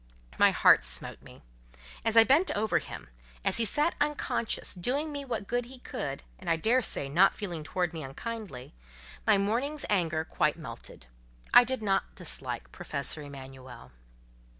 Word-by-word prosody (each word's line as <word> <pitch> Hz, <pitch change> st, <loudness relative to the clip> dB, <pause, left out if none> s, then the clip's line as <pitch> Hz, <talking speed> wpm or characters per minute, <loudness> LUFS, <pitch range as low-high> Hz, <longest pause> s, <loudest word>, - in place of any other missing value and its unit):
My -, -, +7 dB
heart -, -, +5 dB
smote -, -, -2 dB
me: -, -, -15 dB, 0.6 s
as 225 Hz, 0 st, +1 dB
I 225 Hz, -, +10 dB
bent 290 Hz, +9 st, +4 dB
over 215 Hz, +1 st, +2 dB
him, -, -, -9 dB, 0.4 s
as -, -, +2 dB
he 230 Hz, -, +2 dB
sat 300 Hz, +9 st, +2 dB
unconscious, 290 Hz, -5 st, -1 dB
doing 270 Hz, -, -1 dB
me 285 Hz, -1 st, -5 dB
what 230 Hz, -5 st, -3 dB
good 245 Hz, +3 st, -1 dB
he 260 Hz, +2 st, -12 dB
could, 140 Hz, -, -5 dB, 0.2 s
and 185 Hz, -, -6 dB
I 165 Hz, -, +4 dB
daresay 220 Hz, -, +2 dB
not 175 Hz, +8 st, +4 dB
feeling 175 Hz, -7 st, -5 dB
towards 175 Hz, +2 st, -2 dB
me 160 Hz, -, -5 dB
unkindly, 155 Hz, -, -7 dB, 0.5 s
my 215 Hz, -2 st, +6 dB
morning's 245 Hz, +9 st, -1 dB
anger 165 Hz, -5 st, +1 dB
quite 150 Hz, -2 st, 0 dB
melted: 115 Hz, -, -10 dB, 0.5 s
I 245 Hz, -, +10 dB
did 255 Hz, -2 st, -3 dB
not 195 Hz, -2 st, 0 dB
dislike 130 Hz, -, -5 dB
Professor 150 Hz, -2 st, -1 dB
Emanuel. 130 Hz, -, -11 dB
195 Hz, 155 wpm, -29 LUFS, 150-240 Hz, 0.6 s, I